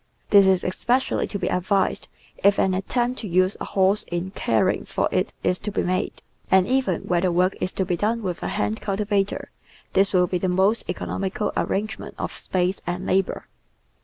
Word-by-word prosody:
This 200 -2 +7
is 190 -1 +3
espe 240 +7 +1
cially - - -2
to 200 - -3
be - - -2
advised 185 +2 0 0.4
if 200 0 +5
an 190 - +2
attempt 240 +6 -1
to 215 - -5
use 185 +2 +2
a - - -2
horse 195 +2 +2
in 175 +2 -4
caring 115 - +1
for - - -1
it - - 0
is 180 - +1
to 210 - -4
be - - -1
made, 185 +1 -2 0.3
and 190 -1 +5
even 255 -9 +1
where 175 -1 +1
the 185 -1 +2
work 180 +2 +2
is 185 - -1
to 190 - -1
be 175 - 0
done 225 +4 0
with 180 -3 -3
a - - -2
hand 105 +1 -2
cultivator 200 0 -1 0.4
this 195 +1 +3
will 180 -2 +4
be 180 0 -2
the 185 - 0
most 190 +5 +2
economical 190 +3 -2
arrangement 215 +2 -2
of - - -3
space 185 +1 -1
and 180 +1 -3
labour. 190 0 0
190 Hz, 195 wpm, -24 LUFS, 180-205 Hz, 0.4 s, This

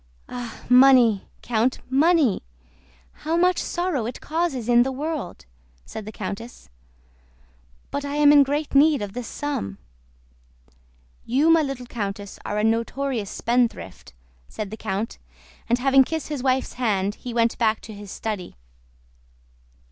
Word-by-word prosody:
"Ah, 245 -2 -7
money, 250 -5 +6 0.2
Count, 240 +2 +1
money! 290 - +3 0.8
How 320 +2 0
much 360 +1 +3
sorrow 345 -10 -2
it 245 - -6
causes 310 -7 -2
in 240 0 +5
the 265 +2 +1
world," 285 - -5 0.4
said 215 - -8
the 215 - -7
countess. 210 - -7 1.2
"But 285 - -3
I 285 0 -4
am 295 -1 +6
in 290 -1 +8
great 290 +2 -1
need 285 -3 +4
of 200 -1 -6
this 245 0 -5
sum." 100 - -4 1.5
"You, 280 +7 +3
my 330 -1 +5
little 275 -4 -4
countess, 205 -4 -5
are 205 - -3
a 210 - 0
notorious 230 0 -1
spendthrift," 235 - -1 0.4
said 210 -2 -6
the - - -4
count, 210 +1 -4 0.5
and 240 - +3
having 270 +1 +5
kissed 320 +3 -4
his 295 -4 -3
wife's 260 0 0
hand 200 -4 +1
he 245 - -8
went 230 0 +1
back 220 -2 +2
to 220 - -10
his 205 -1 -10
study. 210 -3 -5
245 Hz, 140 wpm, -23 LUFS, 220-285 Hz, 1.5 s, in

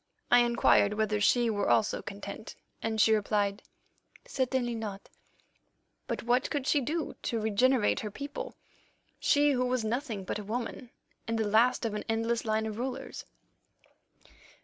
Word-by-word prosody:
"I 245 - +8
inquired 235 -3 +4
whether 210 -1 0
she 240 +3 +4
were 205 -1 0
also 120 -2 +2
content, 200 +2 -8 0.3
and 220 -1 -2
she 220 +1 +5
replied, 205 -1 0 0.6
'Certainly 255 -2 -1
not'; 210 -3 -6 1.0
but - - -3
what 245 +3 +2
could 285 -4 -2
she 290 +1 +3
do 310 +5 -2
to 230 - -2
regenerate 220 +2 +2
her 210 - -4
people, 280 +7 -6 0.6
she 290 0 +4
who 250 -2 +1
was 250 -3 0
nothing 230 -3 -2
but 195 - -3
a - - -6
woman, 235 +3 -4 0.4
and 230 0 -1
the 220 - 0
last 230 +4 +3
of 220 - -1
an 210 - -3
endless 230 +1 0
line 220 0 0
of 215 0 -5
rulers? 255 +1 -5
225 Hz, 150 wpm, -30 LUFS, 210-250 Hz, 1.0 s, I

